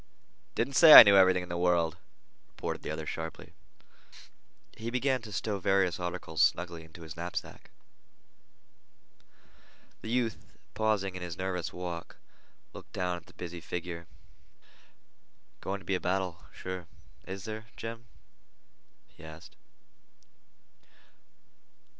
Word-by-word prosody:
"Didn't 130 Hz, +4 st, -1 dB
say 155 Hz, +3 st, +9 dB
I -, -, +15 dB
knew 100 Hz, -2 st, +5 dB
everything 95 Hz, -1 st, +5 dB
in 90 Hz, -, -10 dB
the 85 Hz, -, -3 dB
world," 85 Hz, -2 st, +2 dB, 0.5 s
retorted -, -, -5 dB
the -, -, -6 dB
other 80 Hz, 0 st, -4 dB
sharply. 80 Hz, +1 st, -6 dB, 1.2 s
He 115 Hz, +1 st, -5 dB
began 130 Hz, +1 st, 0 dB
to 110 Hz, -2 st, -10 dB
stow 100 Hz, +1 st, -2 dB
various 95 Hz, -3 st, +1 dB
articles 90 Hz, -3 st, -3 dB
snugly 85 Hz, -1 st, +1 dB
into 80 Hz, +1 st, -13 dB
his 80 Hz, -1 st, -9 dB
knapsack. 85 Hz, +1 st, -6 dB, 2.3 s
The 110 Hz, -, -7 dB
youth, 115 Hz, -2 st, -2 dB, 0.2 s
pausing 105 Hz, -4 st, 0 dB
in 90 Hz, -, -6 dB
his 90 Hz, -1 st, -6 dB
nervous 95 Hz, -2 st, -3 dB
walk, 90 Hz, -2 st, -6 dB, 0.6 s
looked -, -, -12 dB
down 90 Hz, -1 st, -1 dB
at 85 Hz, -, -14 dB
the -, -, -17 dB
busy 85 Hz, -1 st, -7 dB
figure. 85 Hz, 0 st, -6 dB, 1.5 s
"Going 95 Hz, +1 st, -3 dB
to 95 Hz, -, -16 dB
be 100 Hz, -, -1 dB
a 90 Hz, -, +1 dB
battle, 90 Hz, -1 st, -2 dB
sure, 95 Hz, -2 st, -7 dB, 0.4 s
is 95 Hz, 0 st, -6 dB
there, 110 Hz, 0 st, -6 dB
Jim?" 115 Hz, +1 st, -7 dB, 1.0 s
he -, -, -18 dB
asked. 80 Hz, +3 st, -12 dB
90 Hz, 125 wpm, -30 LUFS, 85-100 Hz, 2.3 s, I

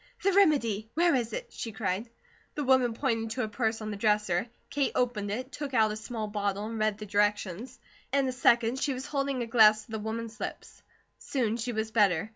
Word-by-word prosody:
"The 395 Hz, -, +4 dB
remedy! 235 Hz, -, +3 dB
Where 345 Hz, +1 st, +4 dB
is 240 Hz, -4 st, 0 dB
it?" -, -, -6 dB
she 225 Hz, -, -5 dB
cried. 205 Hz, +1 st, -2 dB, 0.5 s
The 295 Hz, -, -2 dB
woman 255 Hz, -3 st, +3 dB
pointed 225 Hz, -4 st, -1 dB
to 250 Hz, +3 st, -2 dB
a -, -, -1 dB
purse 220 Hz, 0 st, -1 dB
on 215 Hz, 0 st, -4 dB
the 205 Hz, -, -5 dB
dresser. 210 Hz, -2 st, +1 dB, 0.2 s
Kate 285 Hz, -2 st, 0 dB
opened 235 Hz, -5 st, 0 dB
it, 250 Hz, +6 st, -4 dB
took 285 Hz, -3 st, -5 dB
out 220 Hz, -2 st, +4 dB
a -, -, -3 dB
small 220 Hz, +1 st, -5 dB
bottle, 205 Hz, -1 st, -2 dB
and 225 Hz, 0 st, -5 dB
read 215 Hz, -1 st, +1 dB
the 210 Hz, -, -7 dB
directions. 205 Hz, +3 st, -1 dB, 0.3 s
In 275 Hz, 0 st, +2 dB
a -, -, 0 dB
second, 240 Hz, -1 st, +3 dB
she 280 Hz, 0 st, 0 dB
was 260 Hz, +1 st, -6 dB
holding 275 Hz, -3 st, -1 dB
a -, -, -3 dB
glass 215 Hz, -2 st, +5 dB
to -, -, -17 dB
the 220 Hz, -, -3 dB
woman's 220 Hz, +1 st, -5 dB
lips; -, -, -7 dB, 0.4 s
soon 235 Hz, -5 st, -1 dB
she 240 Hz, +1 st, -3 dB
was 220 Hz, -1 st, -2 dB
better. 200 Hz, -3 st, +2 dB
225 Hz, 215 wpm, -29 LUFS, 210-255 Hz, 0.5 s, glass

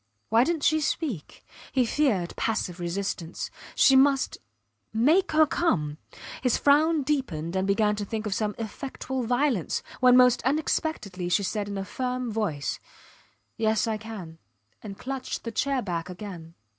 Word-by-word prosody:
Why 225 Hz, +2 st, +5 dB
didnt 325 Hz, +1 st, -1 dB
she 315 Hz, 0 st, +3 dB
speak? 280 Hz, -, -3 dB, 0.3 s
He 255 Hz, -2 st, +2 dB
feared 225 Hz, -10 st, +1 dB
passive 185 Hz, -5 st, -2 dB
resistance. 175 Hz, -1 st, -3 dB, 0.2 s
She 270 Hz, -, +6 dB
must.... 270 Hz, 0 st, +3 dB, 0.5 s
Make 305 Hz, -, +3 dB
her 310 Hz, 0 st, +6 dB
come. 170 Hz, -, 0 dB, 0.4 s
His 250 Hz, -3 st, +2 dB
frown 300 Hz, +2 st, +4 dB
deepened, 190 Hz, -, -2 dB
and 190 Hz, +1 st, 0 dB
he -, -, +5 dB
began 210 Hz, -1 st, +2 dB
to 205 Hz, -, -2 dB
think 220 Hz, +2 st, -4 dB
of 210 Hz, -, -1 dB
some 210 Hz, +1 st, -1 dB
effectual 260 Hz, +3 st, -4 dB
violence, 245 Hz, -, 0 dB, 0.2 s
when 250 Hz, 0 st, +6 dB
most 250 Hz, -1 st, +5 dB
unexpectedly 260 Hz, -, -1 dB
she 200 Hz, +3 st, +2 dB
said 205 Hz, +1 st, -2 dB
in 200 Hz, -, -4 dB
a 195 Hz, -, -3 dB
firm 250 Hz, +1 st, -3 dB
voice, 195 Hz, -10 st, -2 dB, 0.8 s
Yes, 220 Hz, -1 st, +2 dB
I 220 Hz, -1 st, -1 dB
can, 205 Hz, -7 st, -9 dB, 0.4 s
and 195 Hz, -2 st, -8 dB
clutched 265 Hz, -1 st, -5 dB
the 230 Hz, -, -4 dB
chair 265 Hz, +3 st, 0 dB
back 175 Hz, -2 st, -3 dB
again. 175 Hz, -3 st, -8 dB
225 Hz, 155 wpm, -27 LUFS, 190-270 Hz, 0.8 s, She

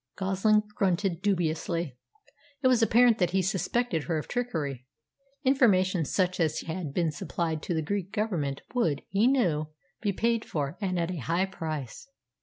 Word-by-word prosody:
Goslin 195 Hz, +2 st, +2 dB
grunted 190 Hz, -4 st, 0 dB
dubiously. 170 Hz, -5 st, -1 dB, 0.7 s
It -, -, +5 dB
was 250 Hz, -2 st, +4 dB
apparent 230 Hz, 0 st, +5 dB
that 180 Hz, -3 st, +3 dB
he 190 Hz, -, +2 dB
suspected 190 Hz, -, 0 dB
her 160 Hz, +3 st, 0 dB
of 155 Hz, -, -4 dB
trickery. 150 Hz, -, -3 dB, 0.6 s
Information 190 Hz, -, +3 dB
such 185 Hz, +4 st, 0 dB
as 160 Hz, -2 st, +1 dB
had 165 Hz, -2 st, -4 dB
been 165 Hz, +2 st, 0 dB
supplied 160 Hz, -1 st, -3 dB
to 175 Hz, -, -2 dB
the 160 Hz, -, 0 dB
Greek 195 Hz, +2 st, -3 dB
Government 175 Hz, -11 st, -2 dB
would, 165 Hz, -, +1 dB
he 200 Hz, +5 st, +3 dB
knew, 175 Hz, -, +2 dB, 0.3 s
be 205 Hz, -, +1 dB
paid 230 Hz, +3 st, +1 dB
for, 145 Hz, 0 st, -3 dB
and 185 Hz, -2 st, -1 dB
at 170 Hz, +1 st, 0 dB
a 180 Hz, -, -4 dB
high 170 Hz, +7 st, 0 dB
price. 155 Hz, -, -6 dB
180 Hz, 160 wpm, -28 LUFS, 160-210 Hz, 0.7 s, It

